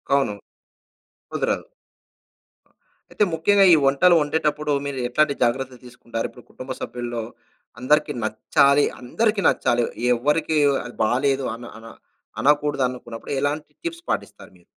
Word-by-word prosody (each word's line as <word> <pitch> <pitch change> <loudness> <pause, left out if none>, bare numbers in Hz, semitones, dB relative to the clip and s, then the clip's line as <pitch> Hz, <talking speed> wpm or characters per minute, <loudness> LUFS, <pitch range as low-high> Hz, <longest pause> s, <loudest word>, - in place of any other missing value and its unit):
అవును. 135 -7 +1 1.0
కుదరదు. - - -1 1.5
అయితే 210 - +1
ముఖ్యంగా 195 +5 +4
ఈ - - +9
వంటలు 155 +6 +5
వండేటప్పుడు 150 0 0
మీరు 140 -2 -4
ఎట్లాంటి 145 +3 +2
జాగ్రత్తలు 125 +1 -1
తీసుకుంటారు? 120 -2 -5
ఇప్పుడు 125 - -16
కుటుంబ 130 +1 -8
సభ్యుల్లో 120 -1 -4 0.6
అందరికి 150 +4 +2
నచ్చాలి, 140 +6 +3 0.2
అందరికి 210 - 0
నచ్చాలి 120 0 +2 0.3
ఎవరికీ 150 +5 0 0.3
అది 120 - -9
బాలేదు 135 +4 +1
అన 120 - -11 0.2
అన 115 - -14 0.6
అనకూడదు 145 -1 +2
అనుకున్నప్పుడు 120 -2 -9
ఎలాంటి 145 +2 -2
టిప్స్ 340 0 -5
పాటిస్తారు - - -4
మీరు? - - -26
140 Hz, 120 wpm, -22 LUFS, 120-150 Hz, 1.5 s, ఈ